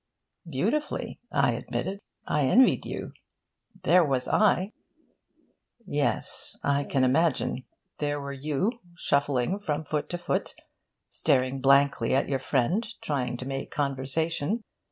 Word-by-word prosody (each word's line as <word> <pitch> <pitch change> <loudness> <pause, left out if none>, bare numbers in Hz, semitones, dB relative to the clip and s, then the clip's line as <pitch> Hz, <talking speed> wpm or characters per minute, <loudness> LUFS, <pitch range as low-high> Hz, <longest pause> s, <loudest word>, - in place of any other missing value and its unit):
'Beautifully,' 220 - -1
I - - +3
admitted. 195 +1 -3 0.3
'I 150 - +1
envied 255 - +4
you. - - -5 0.7
There 180 -1 +6
was 135 -4 +1
I 205 -2 +3 0.5
' 235 - -39
'Yes, 145 -6 0
I 140 0 +1
can 135 -2 +1
imagine. 130 -1 +1 0.3
There 145 -1 -1
were 140 0 -5
you, 150 - -1 0.3
shuffling 140 +3 +1
from 155 -6 -2
foot 150 0 -2
to 175 - -2
foot, 175 - -2 0.6
staring 130 0 +1
blankly 135 -3 +4
at 135 - +2
your 135 -1 0
friend, 135 - +1 0.2
trying 125 -4 -1
to 125 - -6
make 135 0 -4
conversation. 145 - -1
145 Hz, 125 wpm, -27 LUFS, 135-170 Hz, 0.7 s, There